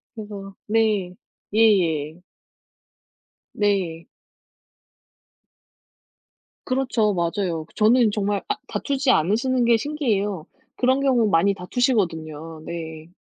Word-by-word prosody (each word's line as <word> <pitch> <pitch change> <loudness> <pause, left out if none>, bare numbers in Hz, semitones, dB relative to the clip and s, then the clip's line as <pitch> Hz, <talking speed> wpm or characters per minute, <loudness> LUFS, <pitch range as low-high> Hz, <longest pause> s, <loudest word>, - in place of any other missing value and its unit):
그래서 205 -3 -8
네. 210 -4 +1 0.4
예예. 175 -8 +2 1.3
네. 190 -6 -1 2.6
그렇죠. 250 -5 +1
맞아요. 170 -1 -1
그 - - -25
저는 225 +1 +4
정말 205 -1 -1
아 415 - 0
다투지 275 -1 -1
않으시는 240 - +2
게 235 0 +5
신기해요. 215 - -2 0.3
그런 260 +2 +2
경우 255 -5 +3
많이 195 +2 +3
다투시거든요. 165 - -2
네. 160 -1 -7
205 Hz, 200 characters per minute, -23 LUFS, 170-235 Hz, 2.6 s, 게